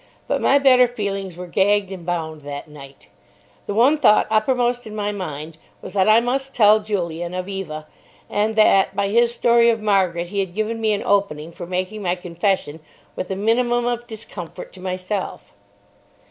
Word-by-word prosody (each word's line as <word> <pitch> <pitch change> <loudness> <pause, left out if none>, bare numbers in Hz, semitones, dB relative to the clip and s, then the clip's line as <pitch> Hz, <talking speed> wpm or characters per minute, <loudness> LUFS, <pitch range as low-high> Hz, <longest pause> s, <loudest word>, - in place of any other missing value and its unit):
But - - -1
my 275 - +4
better 255 -3 +5
feelings 195 -6 -4
were 180 - -6
gagged 195 +2 +1
and 185 -3 -7
bound 160 -3 -3
that 145 +1 -7
night. 135 -8 -14 0.6
The 200 - -3
one 270 +7 +4
thought 215 -7 +5
uppermost 245 +2 +1
in 215 - -8
my 210 -1 -1
mind 160 -5 -6 0.2
was - - -10
that 195 +1 +3
I 215 +1 +7
must 265 +3 -2
tell 215 -2 +6
Julian 175 -4 -3
of 185 0 -4
Eva, 170 -6 -5 0.4
and 215 +1 0
that 205 -3 +4
by 200 0 0
his 235 +2 +3
story 235 0 +4
of 225 -1 +1
Margaret 185 -5 +1
he 200 +1 -3
had 190 -2 -3
given 220 +1 -2
me 220 -1 +2
an 200 - -2
opening 170 -6 0
for 175 +1 -9
making 185 +4 -3
my 180 -2 0
confession 180 -2 -2 0.4
with - - -4
the 190 - -3
minimum 240 +4 +1
of 240 0 -2
discomfort 215 -6 -9
to 185 - -13
myself. 185 +1 -4
200 Hz, 180 wpm, -21 LUFS, 175-225 Hz, 0.6 s, I